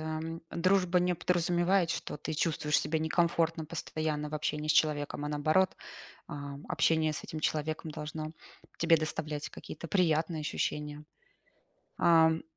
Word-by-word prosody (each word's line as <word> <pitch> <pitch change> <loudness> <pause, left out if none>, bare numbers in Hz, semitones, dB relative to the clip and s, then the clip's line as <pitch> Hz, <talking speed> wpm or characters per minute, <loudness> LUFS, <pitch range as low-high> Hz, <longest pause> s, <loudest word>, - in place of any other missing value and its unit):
м, 160 +1 -4
дружба 180 0 +3
не 180 0 +2
подразумевает, 175 +1 +2
что 160 - -3
ты 150 - -5
чувствуешь 150 -1 +1
себя 155 +2 0
некомфортно 165 0 +1
постоянно 155 -1 -3
в 155 - -6
общении 150 0 -2
с - - +5
человеком, 145 -1 +1
а - - -2
наоборот, 155 +6 +2 0.5
ам, 140 0 -7
общение 160 -1 +2
с - - -6
этим 155 - -6
человеком 155 +1 -1
должно 155 +1 -5 0.5
тебе 165 0 +5
доставлять 155 -1 -3
какие-то 165 - -9
приятные 165 -3 +2
ощущения. 150 0 -3 0.9
Ам. 160 -1 +5
155 Hz, 135 wpm, -31 LUFS, 150-165 Hz, 0.9 s, с